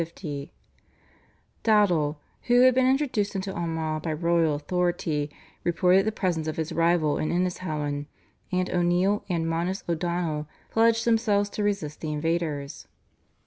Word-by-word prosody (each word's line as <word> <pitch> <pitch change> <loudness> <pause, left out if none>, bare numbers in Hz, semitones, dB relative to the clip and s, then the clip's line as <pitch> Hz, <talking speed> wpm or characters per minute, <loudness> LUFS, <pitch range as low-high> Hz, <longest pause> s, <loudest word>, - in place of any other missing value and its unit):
Dowdall, 180 -9 +3 0.3
who 245 0 +5
had 255 0 +7
been 255 0 +3
introduced 255 -8 0
into 195 0 -3
Armagh 160 -2 -2
by 160 - -3
royal 165 -1 +2
authority, 160 -1 -1 0.3
reported 180 +3 +3
the - - +2
presence 175 -7 -1
of 155 - -3
his 160 +1 -2
rival 165 -2 +2
in 155 - -1
Innishowen, 155 -5 -2 0.4
and 185 0 +1
O'Neill 180 +3 +2
and 165 -2 0
Manus 170 +4 -1
O'Donnell 170 -3 -1 0.2
pledged 230 0 +3
themselves 210 -3 +2
to 210 - -4
resist 200 -8 -2
the 155 - -3
invaders. 150 -2 -2
175 Hz, 130 wpm, -26 LUFS, 155-200 Hz, 0.4 s, had